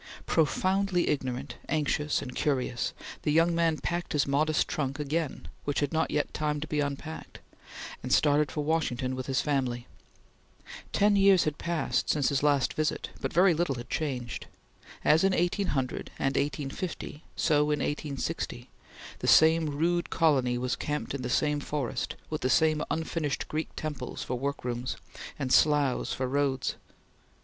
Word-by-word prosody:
Profoundly 185 +3 +2
ignorant, 130 -2 -2
anxious, 150 -1 0
and 125 - -7
curious, 130 -4 0 0.3
the 150 - 0
young 165 +2 +4
man 165 -2 +2
packed 175 +2 -3
his 150 - +2
modest 155 +3 +2
trunk 140 -2 -2
again, 150 +1 -2 0.2
which 145 - -1
had 145 +1 -1
not 160 0 +1
yet 150 - -1
time 150 -1 -1
to 150 - -4
be 150 -1 -2
unpacked, 145 +2 -4 0.6
and 130 - -5
started 145 -1 +4
for 150 - -2
Washington 140 -5 0
with 130 0 -5
his 135 0 +1
family. 130 -5 -1 1.1
Ten 205 0 +4
years 195 -2 +6
had 150 -1 -2
passed 170 -1 -1
since 145 -4 +2
his 140 -2 +1
last 145 -2 +2
visit, 155 0 -1
but - - -2
very 180 +1 +5
little 160 -4 0
had 120 0 -8
changed. 125 -7 -3 0.6
As 155 +3 +5
in 195 0 +4
1800 175 -8 0
and 135 0 0
1850, 145 +3 -3
so 150 -3 +3
in 150 0 +1
1860, 145 -3 -3 0.5
the - - -3
same 160 0 +6
rude 170 +4 0
colony 130 -6 +2
was 125 +1 -1
camped 150 -1 -3
in 140 - -3
the 125 - -3
same 150 +3 +2
forest, 145 -4 -3 0.2
with 155 - -2
the 130 - +1
same 155 +1 +3
unfinished 160 -3 -2
Greek 155 +1 -2
temples 155 -3 -5
for - - -4
work 140 +1 -3
rooms, 125 +1 -3 0.4
and 130 -3 -1
sloughs 145 -4 +3
for 130 - -1
roads. 135 -1 0
150 Hz, 155 wpm, -29 LUFS, 135-160 Hz, 1.1 s, years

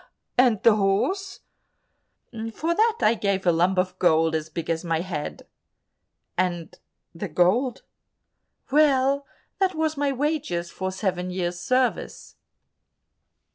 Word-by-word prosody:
"And 245 -5 +3
the 225 -2 +6
horse?" 370 - 0 1.1
"For 330 +2 0
that 450 +4 +2
I 215 - +4
gave 200 -3 -1
a 175 - +5
lump 175 +3 +2
of 185 0 -1
gold 160 -2 +3
as 160 0 -2
big 165 +1 -5
as 165 0 -1
my 165 -2 0
head." 170 -5 -5 0.9
"And 175 -3 -2 0.4
the 175 +4 -5
gold?" 190 - +1 0.9
"Well, 280 -1 +3 0.3
that 380 -2 +1
was 315 -1 -1
my 285 0 +1
wages 265 - -2
for 190 0 -3
seven 185 -2 -2
years' 175 -1 -3
service." 255 +5 -1
195 Hz, 125 wpm, -25 LUFS, 175-275 Hz, 1.1 s, the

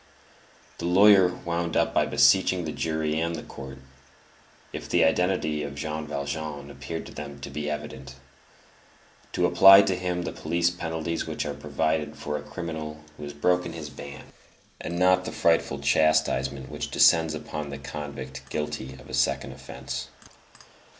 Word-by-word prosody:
The - - -4
lawyer 95 +1 +7
wound 85 -1 -3
up - - +2
by - - +2
beseeching 90 -2 +4
the 80 - -3
jury 80 -1 -1
and 85 0 -1
the 75 - -6
court, 65 -1 -9 1.0
if - - -6
the - - +4
identity 80 -2 +1
of 70 -1 -5
Jean 75 +1 -4
Valjean 70 0 -4
appeared 70 +4 -6
to - - -11
them 70 -1 -8
to 70 - -7
be 75 +1 -3
evident, 70 -3 -6 1.2
to - - +2
apply 95 +1 +9
to 95 - 0
him 90 -1 -2
the - - -3
police 85 0 0
penalties 80 -1 -3
which - - -3
are - - -3
provided 80 -1 -1
for 75 - -4
a 75 - -3
criminal 80 0 -6
who 75 - -9
has 70 - -7
broken 90 +3 +1
his 75 -3 -7
ban, 70 0 -9 0.6
and 85 - -4
not 90 +1 +4
the - - -4
frightful 80 -4 +2
chastisement 70 -2 +1
which - - -4
descends 80 -1 +4
upon 75 -1 -5
the 70 - -6
convict 70 -3 -7
guilty 75 -3 -4
of 65 +1 -14
a - - -10
second 70 +1 +1
offence. - - -7
75 Hz, 160 wpm, -26 LUFS, 70-85 Hz, 1.2 s, apply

